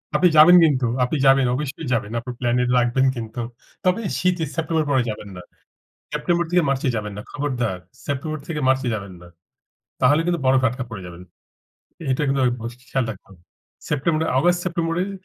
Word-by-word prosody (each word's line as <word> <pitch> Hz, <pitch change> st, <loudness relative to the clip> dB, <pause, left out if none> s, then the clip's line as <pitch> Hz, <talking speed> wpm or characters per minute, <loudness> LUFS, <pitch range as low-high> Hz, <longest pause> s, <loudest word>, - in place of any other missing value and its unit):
আপনি 180 Hz, -, +5 dB
যাবেন 175 Hz, +4 st, +9 dB
কিন্তু, 135 Hz, -5 st, +3 dB, 0.2 s
আপনি 135 Hz, +5 st, 0 dB
যাবেন। 135 Hz, -1 st, +5 dB
অবশ্যই 145 Hz, +1 st, -4 dB
যাবেন। 110 Hz, -2 st, -1 dB
আপনার 125 Hz, +1 st, -7 dB
প্ল্যানে 125 Hz, 0 st, +1 dB
রাখবেন 125 Hz, +2 st, +2 dB
কিন্তু। 115 Hz, +1 st, -5 dB, 0.4 s
তবে 185 Hz, +5 st, +2 dB, 0.2 s
শীতে, 180 Hz, -2 st, +1 dB
সেপ্টেম্বরের 160 Hz, -1 st, 0 dB
পরে 130 Hz, -3 st, +3 dB
যাবেন 105 Hz, -1 st, -6 dB
না। -, -, -7 dB, 0.7 s
সেপ্টেম্বর 170 Hz, +3 st, 0 dB
থেকে 175 Hz, -1 st, +3 dB
মার্চে 135 Hz, -1 st, 0 dB
যাবেন 105 Hz, -2 st, -4 dB
না। -, -, -5 dB
খবরদার! 125 Hz, -9 st, -2 dB, 0.3 s
সেপ্টেম্বর 150 Hz, +2 st, -3 dB
থেকে 155 Hz, -3 st, -3 dB
মার্চে 130 Hz, -1 st, +2 dB
যাবেন 100 Hz, -3 st, -7 dB
না। 90 Hz, -, -13 dB, 0.7 s
তাহলে 145 Hz, +5 st, +4 dB
কিন্তু 175 Hz, -1 st, 0 dB
বরফে 130 Hz, 0 st, +4 dB
আটকা 125 Hz, +2 st, -5 dB
পড়ে 100 Hz, -4 st, -6 dB
যাবেন। 85 Hz, 0 st, -11 dB, 0.9 s
এটা 130 Hz, -, -1 dB
কিন্তু 135 Hz, 0 st, +1 dB, 0.2 s
অবশ্যই 120 Hz, +2 st, -8 dB
খেয়াল 135 Hz, -2 st, +1 dB
রাখুন। 95 Hz, -1 st, -12 dB, 0.5 s
September 155 Hz, +2 st, 0 dB, 0.2 s
August, 175 Hz, +5 st, +3 dB
সেপ্টেম্বরেই 170 Hz, +1 st, -1 dB
135 Hz, 165 wpm, -22 LUFS, 120-160 Hz, 0.9 s, যাবেন